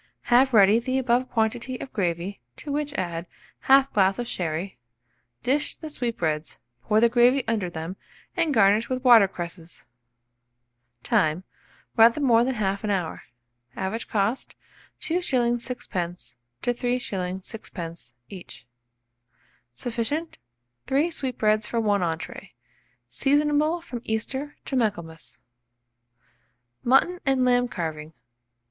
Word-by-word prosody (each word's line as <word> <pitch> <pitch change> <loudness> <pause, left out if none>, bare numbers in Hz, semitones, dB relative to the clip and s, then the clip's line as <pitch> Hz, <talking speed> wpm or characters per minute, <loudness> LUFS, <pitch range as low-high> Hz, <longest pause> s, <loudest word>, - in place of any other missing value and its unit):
Have 260 +2 +6
ready 210 -1 +6
the 255 +2 -1
above 250 0 +1
quantity 235 +3 -1
of 265 - -8
gravy, 175 - -2
to 290 - -7
which 295 0 -1
add 170 -1 -3 0.4
1/2 270 0 +5
glass 195 -1 +3
of 245 - -3
sherry; 170 - -3 0.6
dish 290 +4 0
the 315 -2 -8
sweetbreads, 165 - -2 0.2
pour 215 - +2
the 235 - +6
gravy 245 +3 +4
under 215 -5 0
them, 170 +3 -6 0.4
and 335 -4 +1
garnish 220 -1 +4
with 255 0 -2
water 235 -6 +8
cresses. 175 -2 -8 1.2
Time. 155 +3 +1 0.5
Rather 230 +4 +6
more 235 -5 +4
than 260 +1 -1
1/2 200 0 -1
hour. 185 -5 -1 0.5
Average 205 +5 -3
cost, 215 +4 -1 0.5
2s. 345 +3 0 0.4
6d. 180 - -5 0.3
to 245 - +1
3s. 200 -7 -2
6d. 170 - -8
each. 180 -9 -11 1.1
Sufficient 245 - -3 0.5
3 290 +6 +2
sweetbreads 220 -8 0
for 235 - -1
1 205 -3 +2
entrée. 170 +3 -4 0.5
Seasonable 295 - +2
from 245 -8 -6
Easter 265 +6 -3
to 270 - -3
Michaelmas. 165 - -2 1.5
MUTTON 270 +9 +3
AND 265 -2 +2
LAMB 245 0 +3
CARVING. 160 -4 -5
225 Hz, 115 wpm, -25 LUFS, 180-255 Hz, 1.5 s, water